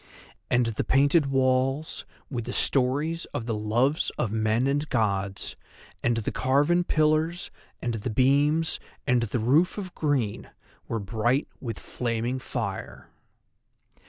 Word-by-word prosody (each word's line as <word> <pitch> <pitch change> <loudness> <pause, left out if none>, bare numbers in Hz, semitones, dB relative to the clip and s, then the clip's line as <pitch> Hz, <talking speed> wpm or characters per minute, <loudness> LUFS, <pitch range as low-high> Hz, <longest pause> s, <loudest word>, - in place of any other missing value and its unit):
And 120 0 +3
the 115 -2 -1
painted 145 +3 +4
walls 135 +2 +1 0.2
with 120 -5 -4
the - - -4
stories 145 +6 +1
of 115 - -2
the 115 - -1
loves 115 +8 +1
of 110 - -1
men 110 +2 +1
and 145 +2 0
gods, 100 -4 -1 0.5
and 120 -1 +1
the 110 - -2
carven 145 +7 +2
pillars 155 +2 +1 0.3
and 120 - 0
the 115 +2 -3
beams, 145 +7 +2 0.3
and 125 -3 +3
the 115 +1 -1
roof 145 - +3
of 185 -3 -5
green, 135 -9 -1 0.4
were 115 - -2
bright 115 +6 0
with 115 -5 -5
flaming 120 +1 -2
fire! 110 -7 -5
130 Hz, 130 wpm, -27 LUFS, 115-145 Hz, 0.5 s, painted